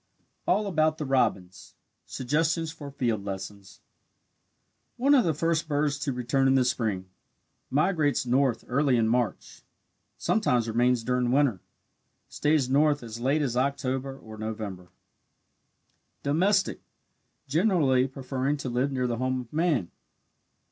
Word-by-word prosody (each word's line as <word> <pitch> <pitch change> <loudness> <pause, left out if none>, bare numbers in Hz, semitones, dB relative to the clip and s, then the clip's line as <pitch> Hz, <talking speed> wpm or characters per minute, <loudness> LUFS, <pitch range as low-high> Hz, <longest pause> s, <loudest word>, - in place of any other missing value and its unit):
ALL 205 +4 +2
ABOUT 155 -4 +1
THE 155 - -4
ROBIN 115 -9 +1 0.6
SUGGESTIONS 160 +5 -1
FOR 150 -3 -9
FIELD 120 -7 -1
LESSONS 95 0 -7 1.2
One 275 +4 +3
of 265 -4 +6
the 160 -3 +1
first 165 +1 0
birds 145 -1 0
to 145 -1 -2
return 130 +2 +1
in 135 - +4
the 130 -2 +3
spring 110 -7 -1 0.6
migrates 150 -2 +1
north 125 -1 +1
early 135 0 +2
in 115 -1 +2
March 120 -2 -2 0.6
sometimes 125 - +1
remains 120 +1 +2
during 125 0 0
winter 130 -8 +2 0.7
stays 150 -3 +1
north 145 +1 +2
as 115 0 -7
late 140 +5 +1
as 125 -4 -2
October 135 0 -1
or 110 -4 -12
November. 105 -5 -6 1.3
Domestic 190 +8 +1 0.7
generally 145 -5 +2
preferring 135 +1 -2
to 135 -2 -5
live 125 +4 0
near 130 -2 -1
the 120 -1 -1
home 130 +1 -1
of 120 +1 -14
man. 155 - +1
135 Hz, 130 wpm, -27 LUFS, 120-150 Hz, 1.3 s, of